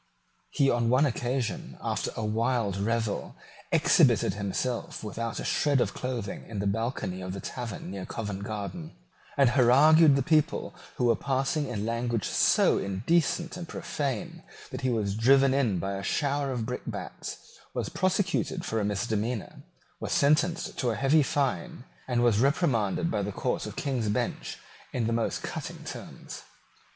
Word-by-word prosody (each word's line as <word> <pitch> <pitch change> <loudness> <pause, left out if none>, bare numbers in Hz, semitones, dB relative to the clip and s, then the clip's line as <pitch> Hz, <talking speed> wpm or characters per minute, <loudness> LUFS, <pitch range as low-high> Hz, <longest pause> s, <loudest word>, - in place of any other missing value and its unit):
He 140 - +2
on 120 -1 +1
one 130 +4 +4
occasion, 125 -2 -2
after - - -2
a 110 - -2
wild 110 -1 0
revel, 110 +1 -1 0.4
exhibited - - +4
himself 105 +6 -3
without 115 +2 -4
a - - -4
shred 145 -3 +2
of - - +1
clothing 125 -5 -4
in 110 - -7
the 100 - -1
balcony 100 -3 -2
of 90 +1 -5
a - - -5
tavern 115 -5 -6
near 95 -1 -6
Covent 100 -3 -4
Garden, 110 - -5 0.4
and 135 -4 +5
harangued 145 +5 +6
the 140 - +1
people 155 +2 +1 0.2
who 125 - 0
were 115 -1 +4
passing 135 +4 0
in 110 -5 -3
language 115 -1 -1
so - - +4
indecent 150 - 0
and 175 -2 -6
profane 140 -7 -4 0.3
that - - -5
he 130 - +1
was 105 -5 0
driven 135 +4 +5
in 125 -9 +2
by 95 +3 -2
a 95 - -4
shower 140 +6 0
of 120 -3 -2
brickbats, - - -5 0.4
was - - -2
prosecuted 185 -1 0
for 110 - -1
a - - 0
misdemeanour, 110 +2 -2 0.4
was - - -4
sentenced 160 +4 +2
to 125 - +1
a 115 - 0
heavy 140 +5 +4
fine, 145 +3 -1 0.2
and 120 -2 +1
was 115 -3 +4
reprimanded 140 - +1
by 105 - 0
the 100 +1 -2
Court - - -2
of - - -7
King's 125 -6 -1
Bench 105 - -2 0.4
in 120 - 0
the 115 - 0
most 115 0 -1
cutting - - -6
terms. - - -8
120 Hz, 160 wpm, -28 LUFS, 105-140 Hz, 0.4 s, harangued